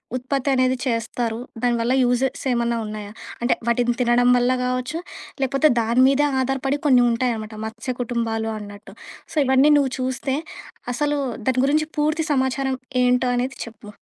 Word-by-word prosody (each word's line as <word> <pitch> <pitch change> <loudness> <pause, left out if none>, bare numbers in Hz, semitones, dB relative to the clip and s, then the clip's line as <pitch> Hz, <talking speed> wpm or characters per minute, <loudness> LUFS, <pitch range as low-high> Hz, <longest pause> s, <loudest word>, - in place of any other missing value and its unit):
ఉత్పత్తి 260 +2 -2
అనేది 255 0 +2
చేస్తారు? 230 -1 -2 0.3
దానివల్ల 240 0 +1
యూజెస్ 250 +1 +1
ఏమన్నా 235 -1 0
ఉన్నాయా? 210 -1 -7 0.3
అంటే 240 +1 +3
వాటిని 240 +1 +2
తినడం 245 0 +3
వల్ల 245 +1 +2
గావచ్చు, 255 +4 -2 0.4
లేకపోతే 275 +3 +3
దాని 230 +2 +2
మీదే 275 +2 +3
ఆధారపడి 270 +2 0
కొన్ని 255 -3 +6
ఉంటాయన్నమాట. 230 -2 -2
మత్స్య 230 +3 -5
కుటుంబాలు 230 -2 -2
అన్నట్టు. 205 -1 -10 0.4
సో, - - -10
ఇవన్నీ 265 +3 +5
నువ్వు 275 -3 +1
చూస్తే, 260 +1 -2 0.6
అసలు 295 +3 0 0.3
దాని 255 -1 +2
గురించి 305 +2 +2
పూర్తి 305 +2 +1
సమాచారం 265 0 0 0.3
ఏంటో 250 0 +2
అనేది 250 +1 -2
చెప్పు. 220 -2 -13
250 Hz, 140 wpm, -22 LUFS, 235-265 Hz, 0.6 s, కొన్ని